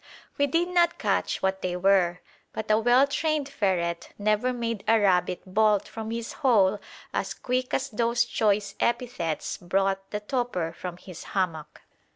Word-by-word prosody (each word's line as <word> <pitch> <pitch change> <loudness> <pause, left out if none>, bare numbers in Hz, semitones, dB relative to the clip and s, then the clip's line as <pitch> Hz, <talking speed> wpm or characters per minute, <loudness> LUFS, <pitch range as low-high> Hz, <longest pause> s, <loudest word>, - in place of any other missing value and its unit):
We 285 - +2
did 335 +5 +1
not 345 -1 +3
catch - - -1
what 190 0 0
they 180 -1 -2
were; 180 -2 +3 0.3
but 215 0 -3
a 215 - +5
well 245 +4 +5
trained 300 0 -1
ferret 180 -9 -1
never 215 +4 +1
made 230 -4 -3
a 225 0 +5
rabbit 180 -3 +2
bolt 210 +1 +2
from 220 -1 -6
his 230 0 -4
hole 210 -6 +3 0.3
as - - -2
quick 255 0 -2
as 270 +1 -1
those 235 +1 +1
choice 205 -3 +1
epithets 235 -10 -1
brought 195 +2 0
the 210 - -3
toper 210 -8 -2
from 175 0 -7
his 180 -2 -10
hammock. 165 -5 -2
210 Hz, 160 wpm, -26 LUFS, 190-245 Hz, 0.3 s, a